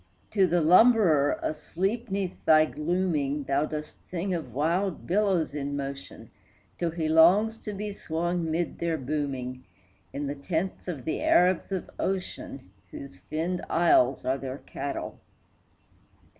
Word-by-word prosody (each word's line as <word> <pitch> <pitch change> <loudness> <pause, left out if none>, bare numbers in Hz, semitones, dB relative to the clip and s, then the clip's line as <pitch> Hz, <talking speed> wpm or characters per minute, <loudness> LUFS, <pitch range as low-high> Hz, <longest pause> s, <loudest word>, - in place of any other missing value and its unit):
To 195 -3 +3
the 175 0 +2
lumberer 180 - +5
asleep 195 +10 -2
'neath 190 -2 -3
thy 155 0 +6
glooming 150 -3 -1
Thou 140 +2 +1
dost 150 0 -6
sing 185 +2 -2
of 160 -8 -4
wild 170 - -1
billows 190 -5 +1
in 140 -1 -3
motion, 140 0 -7 0.5
Till 170 - 0
he 165 -1 -2
longs 185 +8 +5
to 210 - -6
be 205 +1 -5
swung 170 -1 -2
mid 165 +2 -2
their 170 -1 0
booming 130 -3 -3 0.5
In 145 +1 -4
the 140 - -2
tents 160 +7 -3
of 145 -8 -5
the 160 - -2
Arabs 180 +1 +3
of 190 -2 -3
ocean, 180 - -4 0.2
Whose 140 -4 -9
finned 160 - -3
isles 140 -6 +3
are 135 +1 0
their 130 0 -5
cattle. 140 - -5
160 Hz, 140 wpm, -27 LUFS, 140-185 Hz, 0.5 s, thy